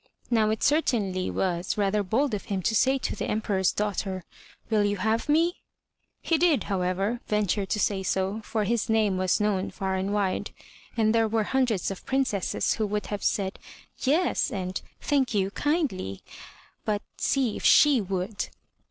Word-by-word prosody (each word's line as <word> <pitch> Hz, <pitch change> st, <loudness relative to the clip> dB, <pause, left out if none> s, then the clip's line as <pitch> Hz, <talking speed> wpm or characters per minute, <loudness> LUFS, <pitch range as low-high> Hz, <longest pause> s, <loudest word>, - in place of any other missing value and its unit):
Now 220 Hz, -2 st, +3 dB
it 220 Hz, 0 st, -1 dB
certainly 215 Hz, -, +1 dB
was 180 Hz, 0 st, -1 dB
rather 205 Hz, 0 st, +2 dB
bold 235 Hz, +7 st, 0 dB
of 205 Hz, -, -3 dB
him 195 Hz, -2 st, -2 dB
to 220 Hz, -, +1 dB
say 265 Hz, +5 st, +3 dB
to -, -, -3 dB
the -, -, -3 dB
Em 215 Hz, -, +1 dB
peror's 190 Hz, -4 st, +1 dB
daughter, 195 Hz, -3 st, -2 dB, 0.5 s
*'Will 215 Hz, -2 st, +3 dB
you 205 Hz, 0 st, 0 dB
have 220 Hz, +7 st, 0 dB
me?*' 335 Hz, +4 st, +3 dB, 0.7 s
He 330 Hz, -2 st, +2 dB
did, 335 Hz, -5 st, +3 dB
however, 195 Hz, +4 st, -1 dB
venture 205 Hz, -1 st, 0 dB
to 210 Hz, -, -1 dB
say 200 Hz, -2 st, +1 dB
so, 190 Hz, +3 st, -1 dB
for 215 Hz, 0 st, -1 dB
his 230 Hz, +2 st, 0 dB
name 215 Hz, -4 st, +2 dB
was 185 Hz, +2 st, +1 dB
known 205 Hz, -3 st, 0 dB
far 190 Hz, -1 st, -3 dB
and 190 Hz, +1 st, -1 dB
wide; 200 Hz, -2 st, -1 dB, 0.4 s
and 220 Hz, -1 st, +3 dB
there 225 Hz, -1 st, +3 dB
were 220 Hz, 0 st, +1 dB
hundreds 235 Hz, -6 st, 0 dB
of 195 Hz, -, -7 dB
Princesses 260 Hz, -8 st, 0 dB
who 215 Hz, -2 st, -1 dB
would 210 Hz, +1 st, -2 dB
have 205 Hz, -, -4 dB
said 195 Hz, -1 st, 0 dB, 0.4 s
'*Yes,*' 315 Hz, +7 st, +2 dB
and 185 Hz, -2 st, -3 dB, 0.2 s
*Thank 270 Hz, -5 st, +1 dB
you, 195 Hz, -1 st, +1 dB
kindly," 270 Hz, -, -1 dB, 0.6 s
but 210 Hz, -1 st, -1 dB
see 260 Hz, -6 st, +1 dB
if -, -, -7 dB
she 290 Hz, -5 st, +6 dB
would! 195 Hz, +2 st, -3 dB
210 Hz, 170 wpm, -27 LUFS, 190-235 Hz, 0.7 s, she